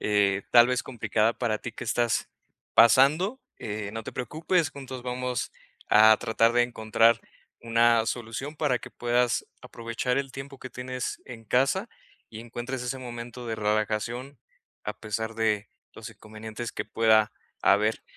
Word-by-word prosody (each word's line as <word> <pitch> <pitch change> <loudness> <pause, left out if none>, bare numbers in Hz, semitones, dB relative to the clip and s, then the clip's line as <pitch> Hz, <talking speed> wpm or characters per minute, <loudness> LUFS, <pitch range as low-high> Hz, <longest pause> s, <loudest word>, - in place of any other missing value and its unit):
eh, 100 -2 +2
tal 120 0 +8
vez, 125 -1 0
complicada 115 -2 0
para 110 -3 -1
ti 125 - -6
que 120 - -7
estás 120 0 0 0.4
pasando, 150 - +5 0.2
eh, 105 -1 -5
no 115 0 -6
te - - -7
preocupes, 155 - 0
juntos 130 -2 -8
vamos 125 0 -3 0.4
a 110 +1 +8
tratar 115 +2 +2
de 120 - +5
encontrar 115 -1 +2 0.4
una 115 0 +3
solución 120 +6 -4
para 140 -6 +1
que - - -10
puedas 120 0 0
aprovechar 120 0 -3
el 135 -1 -2
tiempo 135 0 -8
que 130 - -9
tienes 125 +1 -5
en 115 -2 -10
casa 135 - +1 0.4
y 110 0 -8
encuentres 120 +2 -5
ese 125 +2 -3
momento 120 -1 -8
de 115 - -2
relajación, 110 +5 -2 0.4
a 105 - -5
pesar 110 +1 -4
de 110 -2 0 0.2
los 115 - -9
inconvenientes 110 +2 -8
que - - -4
pueda 110 -1 +3 0.3
haber, 105 +3 +3
120 Hz, 150 wpm, -27 LUFS, 110-125 Hz, 0.4 s, tal